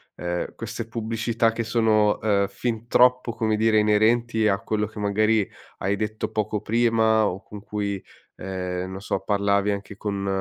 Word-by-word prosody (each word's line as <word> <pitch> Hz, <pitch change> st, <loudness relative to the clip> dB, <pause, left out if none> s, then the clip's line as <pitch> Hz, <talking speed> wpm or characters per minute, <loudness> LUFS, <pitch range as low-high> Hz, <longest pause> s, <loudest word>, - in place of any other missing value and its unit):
ehm, 90 Hz, 0 st, -4 dB
queste 115 Hz, 0 st, -6 dB
pubblicità 115 Hz, 0 st, 0 dB
che 115 Hz, -, -2 dB
sono, 110 Hz, -2 st, +2 dB
ehm, 100 Hz, -2 st, +2 dB
fin 115 Hz, +1 st, -4 dB
troppo, 125 Hz, 0 st, +4 dB
come 110 Hz, -2 st, 0 dB
dire, 110 Hz, 0 st, +3 dB
inerenti 110 Hz, +2 st, +2 dB
a 100 Hz, 0 st, +1 dB
quello 105 Hz, -1 st, -1 dB
che 110 Hz, 0 st, -10 dB
magari 105 Hz, +1 st, +2 dB, 0.3 s
hai 100 Hz, +2 st, 0 dB
detto 110 Hz, +1 st, -3 dB
poco 110 Hz, 0 st, -1 dB
prima 110 Hz, 0 st, +2 dB
o 95 Hz, -1 st, -2 dB
con 105 Hz, -1 st, -10 dB
cui, 100 Hz, -2 st, -3 dB, 0.3 s
ehm, 90 Hz, -1 st, -4 dB
non 95 Hz, -, -6 dB
so, 100 Hz, -, -2 dB
parlavi 100 Hz, 0 st, +1 dB
anche 100 Hz, 0 st, -5 dB
con, 100 Hz, -1 st, -3 dB
110 Hz, 160 wpm, -24 LUFS, 100-115 Hz, 0.3 s, troppo